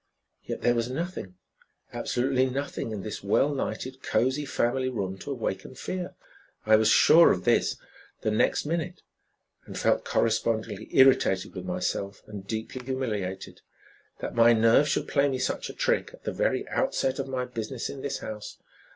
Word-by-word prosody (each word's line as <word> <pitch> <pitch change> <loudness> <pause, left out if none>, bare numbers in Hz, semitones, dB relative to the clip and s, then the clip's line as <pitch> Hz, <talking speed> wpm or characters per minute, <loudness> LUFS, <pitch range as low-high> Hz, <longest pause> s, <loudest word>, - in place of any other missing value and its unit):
Yet - - -5
there 120 - +4
was 120 0 -1
nothing, 140 - -5 0.6
absolutely 130 +1 +1
nothing 135 -2 -3
in 105 -3 -5
this 110 - -6
well 135 +8 +2
lighted, 130 -1 -4
cozy 130 +4 0
family 130 0 0
room 100 -6 -3
to - - -8
awaken 120 -2 -4
fear. 180 +7 -5 0.5
I 110 0 +6
was 110 0 +4
sure 165 +8 +7
of 90 - -1
this - - +2 0.4
the 110 - 0
next 110 - +2
minute, 170 +3 -3 0.6
and - - -7
felt - - +2
correspondingly 110 -2 0
irritated 130 -8 +4
with - - -7
myself 100 0 -3
and 100 -2 -9
deeply 110 +4 -5
humiliated. 110 -8 -4 0.6
That - - -4
my 120 0 +6
nerves 115 +6 +4
should - - 0
play 140 0 +2
me 130 - -1
such 130 - -2
a - - -7
trick - - +1
at - - -25
the - - -3
very - - 0
outset 145 - 0
of 135 - -2
my 130 -1 -2
business 125 0 -5
in 135 - -7
this 140 - -3
house! 105 -1 -7
125 Hz, 165 wpm, -27 LUFS, 110-135 Hz, 0.6 s, sure